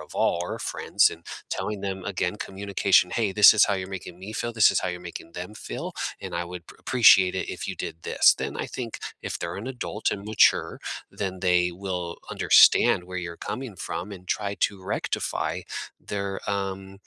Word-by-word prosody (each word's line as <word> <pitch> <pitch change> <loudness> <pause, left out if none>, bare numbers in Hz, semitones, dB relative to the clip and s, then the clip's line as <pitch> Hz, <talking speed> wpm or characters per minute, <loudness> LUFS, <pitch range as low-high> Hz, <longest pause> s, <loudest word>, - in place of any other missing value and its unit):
of - - -12
all 85 - +2
or 90 - -4
friends - - +2
and 85 - -11 0.3
telling 105 -2 -3
them, 95 -2 -4
again, 95 0 -2
communication, 95 -3 +2
"Hey, 105 -2 0
this 105 +1 +9
is 110 - +6
how 100 - +1
you're 95 0 -4
making 90 -2 -7
me 95 +4 -8
feel. 120 +2 -3
This 110 -2 +6
is - - +1
how - - -2
you're 90 0 -5
making 85 -1 -9
them 90 +5 -7
feel, - - -6 0.3
and - - -5
I 85 - -1
would 85 -1 -9
p - - -12
appreciate 95 -7 +5
it 95 - -3
if - - -5
you - - -4
did 80 - -6
this." - - +5
Then - - -4
I - - -3
think 120 -3 -6 0.2
if - - -3
they're 85 +1 -4
an 105 +6 -6
adult 120 -4 -2
and 100 0 -6
mature, 110 0 +3 0.3
then 95 -2 -4
they 90 -1 +3
will 90 -2 -4
understand 90 - +6
where 90 0 -5
you're 85 -1 -6
coming 125 -6 -5
from 90 +3 -5
and 90 -2 -11
try 100 -1 -1
to 100 -2 +1
rectify - - -2 0.4
their, 100 -1 -4
um 95 -1 -3
95 Hz, 200 wpm, -26 LUFS, 90-100 Hz, 0.4 s, this